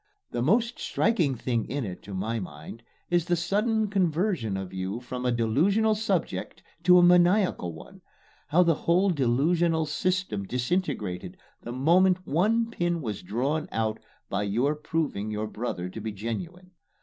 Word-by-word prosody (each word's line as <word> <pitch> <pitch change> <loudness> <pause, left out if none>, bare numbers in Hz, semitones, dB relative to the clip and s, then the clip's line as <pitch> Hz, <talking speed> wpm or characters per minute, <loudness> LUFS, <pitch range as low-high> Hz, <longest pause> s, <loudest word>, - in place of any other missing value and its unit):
The 120 - -2
most 230 - +2
striking 175 - +1
thing 120 -1 -1
in 135 +2 -3
it 90 -3 -7
to 100 - -7
my 110 +5 -2
mind 80 +4 -9 0.3
is 175 -2 +2
the 175 -1 +2
sudden 210 +5 +1
conversion 175 - 0
of 95 -1 -6
you 95 +4 -3
from 125 0 -4
a - - +2
delusional 170 - +2
subject 215 +1 -2 0.2
to 180 0 +8
a 175 - +6
maniacal 180 - +4
one 80 - -13 0.5
how 175 +4 +4
the 170 -1 +3
whole 180 +5 +2
delusional 160 +4 +2
system 180 - -1
disintegrated 125 - -2 0.2
the 120 - -7
moment 180 +8 +3
one 225 +9 +1
pin 175 -4 -1
was 105 -5 -4
drawn 135 +11 -2
out 110 -1 -1 0.3
by 100 - -1
your 115 +8 +1
proving 150 -8 -2
your 105 0 -2
brother 105 -5 -4
to 110 +4 -8
be 110 +1 -3
genuine. 165 - -6
150 Hz, 155 wpm, -27 LUFS, 110-180 Hz, 0.5 s, to